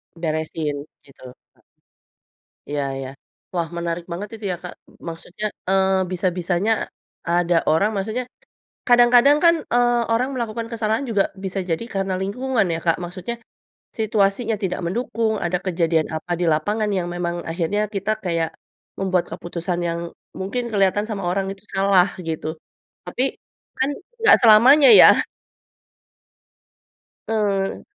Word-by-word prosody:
Beresin 155 -3 -3 0.2
gitu, 135 -2 -19 0.3
he - - -30 1.1
Iya 145 -1 -1 0.2
iya. 130 -1 -5 0.5
Wah, 170 -1 0
menarik 170 0 -3
banget 200 +4 -5
itu 215 -2 -9
ya, - - -1
Kak, 180 - -7 0.4
maksudnya, 175 +5 -7 0.2
eee, 190 0 +3 0.2
bisa-bisanya 180 +2 0 0.6
ada 175 0 +2
orang 195 +7 +3
maksudnya 220 +6 -2 0.6
kadang-kadang 245 +4 +6
kan, 335 0 +6 0.2
eee, 240 0 +3
orang 250 +4 +1
melakukan 230 -1 -3
kesalahan 225 +3 -1
juga 205 -3 +3 0.2
bisa 190 +1 -3
jadi 165 +7 -1
karena 195 -1 -1
lingkungan 245 +3 0
ya, 165 - -2
Kak. 165 - +3
Maksudnya 185 +7 -5 0.6
situasinya 215 +1 +1
tidak 185 - -1
mendukung, 225 +3 -1
ada 180 +1 0
kejadian 165 -3 +1
apa 175 +3 -6
di 175 - +1
lapangan 210 +7 -1
yang 175 -1 -2
memang 175 -1 -2 0.2
akhirnya 175 +5 -1
kita 195 +2 -1
kayak, 165 -2 0 0.5
membuat 185 -2 +1
keputusan 175 +1 -4
yang 170 0 -2 0.4
mungkin 235 +6 -3
kelihatan 205 +1 +2
sama 200 -4 -4
orang 195 +1 -1
itu 195 +1 -7
salah 195 -1 +4 0.2
gitu, 160 0 -4 0.5
tapi 255 - -1 0.6
kan 265 +2 +2 0.3
nggak 435 -2 +7
selamanya 250 +7 +7
ya. - - +10 2.2
Betul. 200 -3 -1
195 Hz, 130 wpm, -22 LUFS, 170-220 Hz, 2.2 s, ya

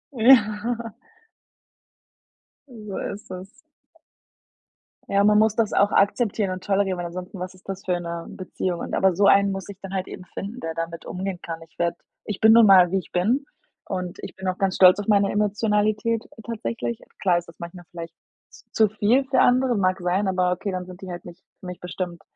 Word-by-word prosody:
Ja. 230 -1 +3 1.8
So 215 -6 -8 0.2
ist 205 - -12
es. 185 +1 -7 1.6
Ja, 200 0 +3
man 210 0 +5
muss 215 0 +3
das 225 -2 0
auch 200 +1 +3
akzeptieren 205 -1 +1
und 185 0 -6
tolerieren, 195 -2 +1
weil 175 -1 -3
ansonsten 185 +3 -8
was 185 +1 -5
ist 185 - -22
das 195 0 -5
für 180 -2 0
'ne 170 -1 -5
Beziehung 185 -1 -4
und - - -6
aber 190 -1 +3
so 200 +3 +3
einen 200 0 +5
muss 195 -1 -5
ich 200 -2 -9
dann 195 -1 -8
halt 190 -1 -2
eben - - -9
finden, 210 +6 -6
der 165 - -4
damit 165 0 -5
umgehen 185 0 -4
kann. 165 -1 -6
Ich - - -35
werde 170 0 0 0.3
ich 210 - -4
bin 220 0 +7
nun 230 -1 +8
mal, 185 -3 +7
wie 195 - +2
ich - - -13
bin 225 +11 +1 0.4
und 180 -2 -4
ich - - -8
bin 190 - -6
auch 185 0 -1
ganz 195 -1 0
stolz 185 +1 +7
auf 205 - -5
meine 200 -1 +4
Emotionalität 210 +2 +1 0.3
tatsächlich. 120 - -4 0.2
Klar 180 -3 +3
ist 175 0 -5
das 170 - -16
manchmal 170 +1 -9
vielleicht 165 -1 -8 0.4
z - - -18
zu 220 - +4
viel 215 +6 +2
für 265 0 +2
andere, 250 0 +3
mag 185 -1 +1
sein, 180 +3 0
aber 185 -1 +1
okay, 195 +3 -4
dann 185 -1 -4
sind 180 0 -12
die 190 - -8
halt 175 - -8
nicht 175 -1 -12 0.2
für - - -13
mich 180 -1 -7
bestimmt, 180 -1 -5
195 Hz, 200 wpm, -24 LUFS, 180-210 Hz, 1.8 s, nun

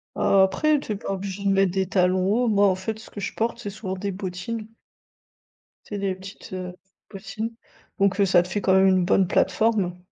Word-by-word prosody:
Heu, 195 - +3
après, 290 +11 +2
t'es 215 -6 -4
pas 195 - -5
obligée 195 0 -5
de 200 - +2
mettre 195 -2 +3
des 190 -2 0
talons 185 -1 +2
hauts, 245 +2 +2
moi, 205 -2 +4
en 185 - +2
fait, 200 +4 -4
ce - - -13
que 205 - -9
je 195 - -4
porte, 230 +1 -2
c'est 205 - -5
souvent 195 -2 -5
des 200 +1 -3
bottines. 190 +4 -5 1.2
C'est 205 - -5
des 195 -2 -1
petites, 190 0 -11
heu, 180 -1 -5 0.4
bottines. 220 +3 -6 0.5
Donc 200 0 +2
heu, 200 - +5
ça 180 -2 +4
te - - -9
fait 205 +3 -2
quand 190 - +2
même 190 0 +5
une 185 -1 +3
bonne 185 +1 +3
plateforme. 200 -3 +1
195 Hz, 215 wpm, -24 LUFS, 185-210 Hz, 1.2 s, heu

